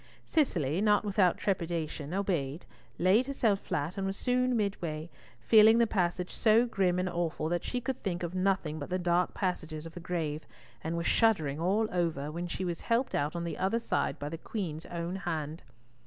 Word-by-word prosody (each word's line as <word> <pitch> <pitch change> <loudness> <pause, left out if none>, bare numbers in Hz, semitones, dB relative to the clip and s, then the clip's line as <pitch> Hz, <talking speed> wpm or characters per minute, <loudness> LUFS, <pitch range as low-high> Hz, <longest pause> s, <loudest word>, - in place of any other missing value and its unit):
Cicely, 175 - +1
not 210 0 +3
without 190 -3 +3
trepidation, 165 -5 -2
obeyed, 175 -6 -1 0.3
laid 200 +9 +4
herself 230 -8 +1
flat, 160 +4 -3
and 195 - -1
was 195 +1 -3
soon 250 -1 +1
midway, 170 -6 -2 0.3
feeling 220 0 +7
the 235 - +5
passage 180 -4 -1
so 225 +2 +4
grim 190 -6 +1
and 180 0 0
awful, 170 -3 -2
that 175 0 -1
she 250 - -2
could 260 +1 -4
think 180 -3 -2
of 175 0 -3
nothing 185 -5 0
but 145 - -6
the 180 - 0
dark 175 0 +1
passages 160 -5 -3
of 165 - -9
the - - -7
grave, 165 -3 -3 0.4
and 165 +1 -2
was 170 - -2
shuddering 160 -11 +2
all 200 +6 +2
over, 165 -5 -1
when 170 +2 -4
she 185 +2 -3
was 170 -2 -3
helped 235 +3 0
out 145 +3 0
on 170 - -2
the 170 -2 -4
other 190 +5 +1
side 235 - -1
by 145 - -5
the 165 +1 -6
Queen's 165 -6 -5
own 170 +2 -4
hand. 160 -4 -3
180 Hz, 190 wpm, -30 LUFS, 165-205 Hz, 0.4 s, feeling